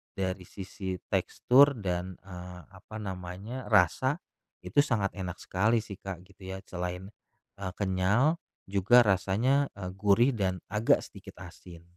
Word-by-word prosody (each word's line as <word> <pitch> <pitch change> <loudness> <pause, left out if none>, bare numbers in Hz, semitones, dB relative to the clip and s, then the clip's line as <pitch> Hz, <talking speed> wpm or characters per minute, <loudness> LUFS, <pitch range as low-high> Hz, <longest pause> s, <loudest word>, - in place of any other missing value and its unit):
dari 95 -1 -3
sisi 95 -1 -6 0.2
tekstur 140 +3 +4
dan, 90 0 -2
eee, 90 -1 -9
apa 95 +3 -13
namanya, 95 +5 -6
rasa, 125 - +3 0.4
itu 145 - +1
sangat 115 -9 +2
enak 90 -3 -5
sekali 110 +4 +1
sih, 100 -3 -9
Kak, 95 -3 -7
gitu 95 0 -14
ya. 95 - -9
Selain, 90 +2 -5 0.5
eee, 95 -2 -4
kenyal, 100 - +2 0.2
juga 100 +6 +5
rasanya, 110 +8 +2
eee, 90 -2 -5
gurih, 105 +6 +4
dan 95 -6 -2
agak 110 +2 +3
sedikit - - -12
asin. 85 -1 -12
95 Hz, 135 wpm, -29 LUFS, 90-110 Hz, 0.5 s, juga